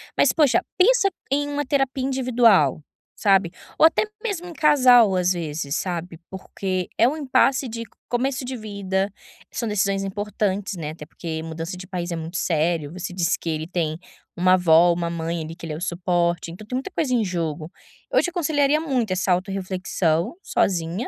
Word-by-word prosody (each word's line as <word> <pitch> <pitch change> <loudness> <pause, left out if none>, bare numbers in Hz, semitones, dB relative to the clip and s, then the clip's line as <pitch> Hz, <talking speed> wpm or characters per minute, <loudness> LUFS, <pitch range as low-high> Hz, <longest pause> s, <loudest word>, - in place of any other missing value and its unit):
Mas - - +4
poxa, 300 -6 +3 0.2
pensa 395 +1 +4 0.2
em 290 +1 +1
uma 290 0 -2
terapia 270 -1 0
individual, 235 - +3 0.3
sabe. 195 -4 +3 0.3
Ou - - +8
até 325 - +4 0.2
mesmo 365 -6 -3
em 340 - -8
casal, 250 -10 +5
às 180 0 +2
vezes, 155 -4 -3
sabe, 175 -2 -4
porque 190 -1 -4
é 230 - +6
um 300 +4 -1
impasse 270 -2 +2
de 230 0 -5 0.3
começo 255 +1 -1
de 255 0 -4
vida, 200 -3 -2 0.4
são 230 - -3
decisões 195 -1 0
importantes, 200 0 -2
né, 155 -2 -4
até 155 -1 -10
porque 160 0 -6
mudança 165 +2 -5
de 185 0 -9
país 180 -2 -4
é - - -1
muito 165 +2 -5
sério. 160 -2 0
Você 185 0 -5
disse 175 -2 0
que 165 - -5
ele 155 0 -2
tem 165 -3 -2 0.4
uma 185 +1 +4
avó, 175 -1 +5
uma 170 0 -2
mãe, 165 0 -3
ali, 160 +1 -7
que 170 - -10
ele 155 - -4
é - - -5
o - - -9
suporte, 175 -1 0
então 205 +5 -10
tem 250 - -4
muita 270 +9 -4
coisa 295 -6 0
em 230 -3 +2
jogo. 165 -3 -3 0.4
Eu - - +4
te 355 - -1
aconselharia 305 -4 +1
muito 255 -10 -1
essa 185 0 0
autorreflexão, 185 - -1
sozinha, 175 +5 0
190 Hz, 180 wpm, -23 LUFS, 170-250 Hz, 0.4 s, Ou